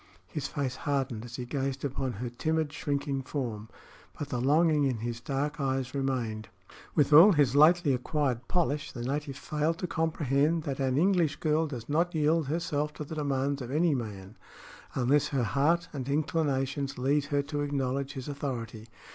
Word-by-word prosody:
His 145 -2 -4
face 135 -4 -3
hardened 135 -5 -2
as 120 -1 -8
he 125 - -5
gazed 135 +2 -2
upon 135 -2 -2
her 120 +4 -4
timid, 155 +3 -1
shrinking 145 -3 -2
form, 120 -6 -4 0.5
but 145 - -5
the 125 -3 -2
longing 150 +2 +3
in 130 -4 +1
his 115 +1 -4
dark 145 +4 -2
eyes 130 -1 -1
remained. 125 -6 -2 0.5
With 150 -1 +3
all 175 +7 +9
his 140 -4 +3
lately 155 0 +6
acquired 125 -1 -1
polish, 150 -5 0
the 120 - -6
native 140 +1 -3
failed 155 +3 -1
to 180 - -3
comprehend 160 -1 +1
that 140 -2 -4
an 130 -1 +1
English 175 -3 +3
girl 155 0 +1
does 125 -6 -7
not 170 +4 +1
yield 155 0 +2
herself 150 -1 -1
to 150 - -6
the 150 - -8
demands 140 -2 -1
of 125 - -6
any 155 +3 +2
man 105 -5 -5 0.6
unless 140 +3 +3
her 135 -4 0
heart 160 +9 +2
and 135 -2 -4
inclinations 140 -2 0
lead 140 +3 +1
her 145 -1 0
to 145 0 -3
acknowledge 140 -1 -1
his 130 -2 -6
authority. 120 -6 -5
140 Hz, 170 wpm, -29 LUFS, 130-150 Hz, 0.6 s, all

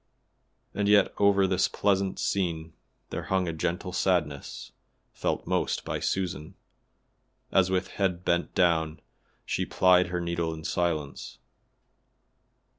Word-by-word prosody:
And 105 0 0
yet 105 -1 +5
over 100 -1 +4
this 95 0 +2
pleasant 100 -1 0
scene 85 -4 -2 0.4
there - - -4
hung 95 -2 0
a 85 - -2
gentle 90 +3 -3
sadness, 80 -9 -1 0.4
felt - - -2
most - - -1
by - - -2
Susan, 95 -2 -3 1.0
as 95 -1 +4
with 95 0 0
head 90 -3 -1
bent 85 0 0
down 80 -3 +2 0.5
she - - -1
plied 90 -1 +4
her 90 0 -2
needle 85 -1 -2
in 80 - -10
silence. 80 -5 -2
90 Hz, 120 wpm, -27 LUFS, 85-95 Hz, 1.0 s, yet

